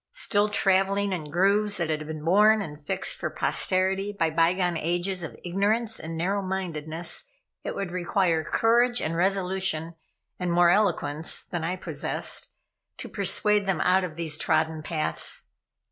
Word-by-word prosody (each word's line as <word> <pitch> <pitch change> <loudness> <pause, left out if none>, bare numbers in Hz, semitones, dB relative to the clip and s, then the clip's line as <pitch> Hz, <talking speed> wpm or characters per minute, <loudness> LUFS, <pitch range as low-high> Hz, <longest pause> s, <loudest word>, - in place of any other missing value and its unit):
Still 210 - +1
traveling 195 0 +2
in 155 -5 -5
grooves 200 +5 +2
that 165 -3 -1
had 155 0 -3
been 155 -1 -6
worn 210 +5 +5
and 150 -3 -9
fixed - - -2
for - - -3
posterity 190 +2 0
by 165 -6 0
bygone 175 +2 +2
ages 175 +3 -1
of 165 - -7
ignorance 210 +5 0
and 160 +1 -6
narrow 195 +4 0
mindedness, 170 -4 -3 0.4
it - - -4
would 195 -3 -3
require 175 -2 +1
courage 240 +7 +3
and 160 +1 -2
resolution, 185 -3 0 0.5
and 180 -1 -1
more 175 0 +5
eloquence 175 -6 +1
than 175 -2 -5
I 175 +3 -1
possessed, 185 - -3 0.5
to - - -7
persuade 205 +1 +2
them 190 - +1
out 185 +1 +3
of 170 -4 -5
these 160 -2 -4
trodden 160 0 +1
paths. 80 - -2
180 Hz, 150 wpm, -26 LUFS, 165-195 Hz, 0.5 s, worn